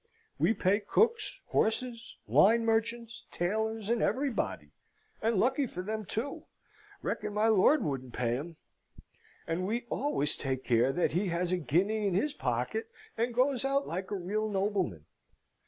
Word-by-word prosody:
We 175 +10 +3
pay 190 +3 +2
cooks, 445 - +1
horses, 230 +1 -1
wine 230 +3 +5
merchants, 230 +1 -1
tailors, 220 +4 -1
and 235 0 +1
everybody 270 -2 -1 0.5
and 225 +1 +1
lucky 260 +7 +2
for 180 -4 -6
them 215 +1 -3
too 240 +9 -4 0.6
reckon 210 -1 -3
my 215 +2 +3
lord 225 +7 +5
wouldn't 130 -6 -3
pay 120 -1 0
'em! 165 +2 -8 0.9
And 175 +3 -2
we 235 +3 -2
always 150 - 0
take 130 -1 -3
care 120 +2 +3
that 175 +5 +1
he 185 +5 0
has 175 0 -1
a 185 - +2
guinea 200 +7 +1
in 185 - 0
his 280 +10 +1
pocket, 445 +8 -2 0.3
and 235 +2 0
goes 255 +2 +2
out 275 +1 +1
like 185 +3 -4
a 205 - -2
real 205 +4 -2
nobleman. 190 - -1
215 Hz, 155 wpm, -31 LUFS, 175-235 Hz, 0.9 s, wine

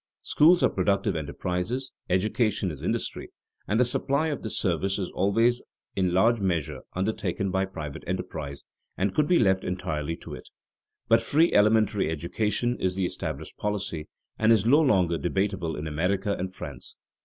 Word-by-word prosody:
Schools 165 +1 +5
are 130 - +5
productive 100 0 0
enterprises, 90 - -3 0.2
education 105 +1 +1
is 75 - -9
industry, - - -3 0.4
and 110 +3 +1
the 125 - +5
supply 140 +5 0
of 145 - -3
this 110 - -3
service 95 +2 0
is 95 -3 -3
always 115 +6 +2 0.3
in 95 -2 +1
large 110 +5 +3
measure 85 -6 -1 0.2
undertaken 95 -1 -1
by 95 +1 +1
private 75 -7 -7
enterprise 80 -6 -4 0.3
and 95 +1 0
could 150 -1 +2
be 180 - +4
left 95 - +3
entirely 80 -4 -3
to - - -10
it. - - -10 0.6
But 115 0 +5
free 155 +8 +3
elementary 105 -3 +3
education 105 +9 -1
is 90 -1 0
the 95 -1 0
established - - -5
policy, 100 -7 -3 0.3
and 110 +1 +4
is 110 -3 +4
no 145 +7 +6
longer 90 - +2
debatable 95 -2 -1
in 75 - -5
America 90 +6 0
and 95 +1 -4
France. - - -8
95 Hz, 160 wpm, -27 LUFS, 90-110 Hz, 0.6 s, no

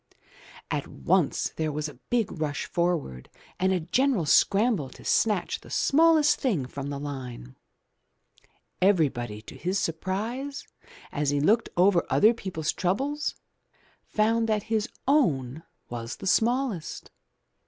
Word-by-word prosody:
At - - -2
once 65 - +1
there 155 -1 -1
was 150 +1 -3
a 150 - -9 0.2
big 235 -4 +1
rush 155 -4 -3
forward 170 - -2 0.3
and 190 +1 +2
a 185 - +2
general 220 - +1
scramble 200 - +3
to - - -15
snatch 210 -5 +1
the - - -14
smallest 315 0 +4
thing 195 - 0
from 140 +2 -6
the 140 - -4
line. 125 - -7 1.3
Everybody 135 - +1
to - - -11
his 185 +3 -2
surprise, 210 - -3 0.5
as 145 -1 -1
he 145 0 +1
looked 215 +11 +3
over 180 -1 +4
other 220 +3 +5
peoples' 180 -8 -3
troubles, 275 +12 -1 0.7
found 225 +1 +1
that 210 -2 +1
his 215 -1 0 0.2
own 155 - +2 0.3
was 115 -1 -5
the - - -10
smallest. 230 - 0
185 Hz, 130 wpm, -27 LUFS, 145-225 Hz, 1.3 s, other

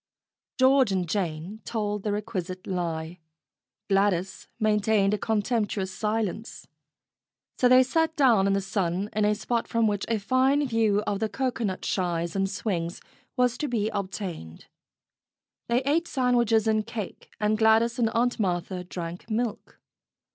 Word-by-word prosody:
George 260 -3 +4
and 185 -2 0
Jane 180 +2 -3
told 210 -2 -2
the 210 - -2
requisite 195 -4 -4
lie. 170 -2 -3 0.7
Gladys 195 -2 0
maintained 210 -2 +2
a - - +1
contemptuous 210 -3 -1
silence. 215 +1 -3 0.9
So 250 - +5
they 255 +1 +7
sat 320 +5 0
down 235 -10 +4
in 195 - +2
the 195 - +1
sun 195 -1 -2
in 215 0 +1
a 210 0 +2
spot 235 +2 -2
from 230 -1 +1
which 205 -2 0
a 225 - +2
fine 260 +7 +2
view 220 -3 +2
of 200 - -1
the 220 0 -1
cocoanut 235 -5 -2
shies 170 -2 -1
and 195 0 +1
swings 180 -4 -3 0.4
was 250 0 +2
to 300 - -1
be 220 -4 0
obtained. 185 - -5 1.0
They 240 +2 +1
ate 320 +5 +1
sandwiches 240 -4 +2
and 215 0 +1
cake, 220 -4 -6
and 210 0 +2
Gladys 225 +2 +3
and 230 -2 +3
Aunt 240 +2 0
Martha 180 -2 -1
drank 175 +2 -7
milk. 225 0 -3
210 Hz, 145 wpm, -26 LUFS, 190-235 Hz, 1.0 s, they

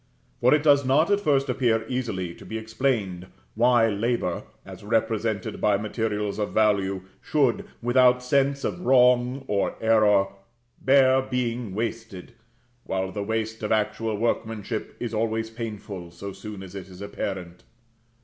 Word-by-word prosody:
For 125 - +4
it 150 0 +4
does 140 -2 +5
not 145 +8 +3
at 200 - +4
first 140 -7 +2
appear 120 -4 +1
easily 110 -9 -3
to - - -14
be 110 - -5
explained 110 -5 -2 0.3
why 120 0 +4
labor, 110 -4 -1 0.2
as - - -11
represented 110 -1 -1
by 105 -2 +3
materials 105 -1 -2
of 105 - -2
value, 100 -3 +2 0.2
should, 135 -6 +1 0.2
without 125 +1 +4
sense 140 +2 +1
of - - -2
wrong 125 -3 +3
or 100 -1 0
error, 105 -3 +4 0.5
bear 130 -1 +5
being 120 -5 -3
wasted; 110 -2 -5 0.5
while 95 0 -2
the 105 - -4
waste 110 +1 -3
of 105 - -3
actual 110 0 0
workmanship 110 -1 -2
is 120 -2 -4
always 110 0 -1
painful, 105 -6 -6
so 95 +4 -8
soon 105 -2 -8
as 95 -1 -11
it 95 -1 -8
is 90 -1 -12
apparent. 95 -3 -5
110 Hz, 145 wpm, -25 LUFS, 100-125 Hz, 0.5 s, does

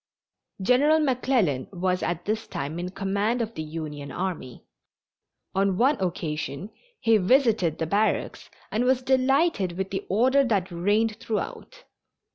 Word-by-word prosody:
General 285 +8 +4
McClellan 250 - +1
was 185 -1 -1
at 175 0 -2
this 220 +2 -2
time 145 +5 -4
in 180 +1 -3
command 200 +5 -1
of 230 -1 -3
the 155 - -5
Union 150 -3 -6
army. 175 -9 -5 0.9
On 195 -1 +1
one 270 +7 +4
occasion 165 0 -3 0.3
he 225 -1 +4
visited 215 - +2
the 160 - -1
barracks 205 +6 -1 0.2
and 220 +3 +1
was 255 0 +2
delighted 265 - +2
with 190 +2 -4
the 195 - -3
order 260 +8 +4
that 200 -7 0
reigned 210 +5 +1
throughout. 235 - -5
200 Hz, 135 wpm, -25 LUFS, 175-245 Hz, 0.9 s, General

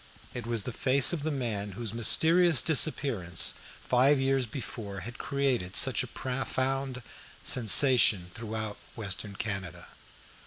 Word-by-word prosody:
It 120 -2 -7
was 115 -3 -1
the 125 - -6
face 135 +5 +3
of 165 - -3
the 155 - -2
man 110 -8 -4
whose 110 +1 -5
mysterious 160 +5 +4
disappearance 135 - +1 0.3
five 135 +3 +3
years 135 -1 0
before 105 -5 -7
had 120 +6 -9
created 135 -10 -2
such - - +4
a - - -5
profound 130 0 -3 0.4
sensation 110 -5 +4
throughout 110 -2 -6 0.2
Western 100 -1 -6
Canada. 95 -5 -6
120 Hz, 125 wpm, -28 LUFS, 105-135 Hz, 0.4 s, mysterious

